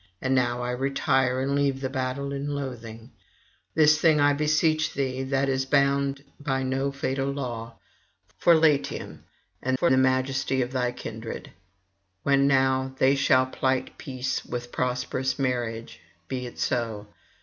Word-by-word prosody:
And 130 - 0
now 125 -1 +1
I 125 - -2
retire, 130 0 +1
and 135 +1 0
leave 140 -1 +1
the 135 - -2
battle 130 +1 -3
in 140 +1 -3
loathing. 115 -4 -7 0.7
[819 160 - +6
854]This 150 0 +6
thing 160 -3 +4
I 145 0 +4
beseech 155 +2 +1
thee, 130 -1 -1
that 135 +1 0
is 135 0 0
bound 140 0 +2 0.2
by 135 -2 -1
no 135 +1 -1
fatal 135 0 -2
law, 120 -4 -5 0.6
for 170 - +6
Latium 155 -3 +1 0.4
and 130 0 0
for 170 - +2
the 130 - +5
majesty 130 0 +1
of 120 - -6
thy 125 -2 0
kindred. 115 -1 -7 0.7
When 140 0 +3
now 130 -1 +2
they 130 +1 +4
shall 130 -2 +3
plight 130 0 -1
peace 130 -1 -3
with 120 0 -6
prosperous 125 +1 -1
marriages 120 -4 -2 0.3
(be 125 -1 -4
it 120 - -11
so!) 115 -4 -1
130 Hz, 150 wpm, -26 LUFS, 125-140 Hz, 0.7 s, 819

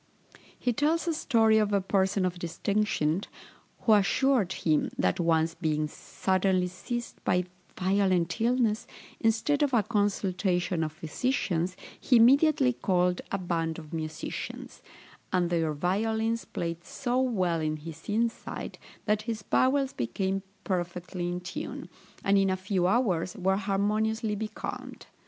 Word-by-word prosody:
He 245 - 0
tells 315 +7 +1
a 335 - +2
story 225 -7 +3
of 210 -1 +1
a 200 - +4
person 190 0 +1
of 180 -1 -2
distinction, 175 -1 0 0.6
who 220 - +4
assured 210 0 +3
him, 155 -2 +1
that 90 - +1
once 165 -1 +2
being 155 -3 -1
suddenly 185 +3 0
seized 240 +6 -6
by 180 0 +2 0.4
violent 185 -2 +1
illness, 230 -2 +1 0.3
instead 225 +7 +2
of 280 -4 +2
a 220 - +4
consultation 190 -5 0
of 155 - -2
physicians, 175 - -1 0.2
he 255 - +3
immediately 270 +3 +5
called 180 -4 +1
a 195 - +1
band 165 -3 -2
of 155 -2 -10
musicians; 155 -1 -5 0.5
and 175 -2 +1
their 165 -2 +1
violins 220 +8 0
played 170 0 -4
so 250 +3 -1
well 185 -10 +1
in 155 0 -1
his 165 +3 -10
inside, 230 +2 -2 0.3
that 210 0 +2
his 220 -2 -3
bowels 270 +4 +2
became 190 - -1 0.2
perfectly 175 -1 -3
in 175 0 -3
tune, 180 +1 -6 0.3
and 195 0 +4
in 195 0 +3
a 190 - 0
few 185 -1 0
hours 190 -4 +1
were 190 0 +2
harmoniously 210 +2 0
becalmed. 215 +1 -6
195 Hz, 135 wpm, -28 LUFS, 175-225 Hz, 0.6 s, immediately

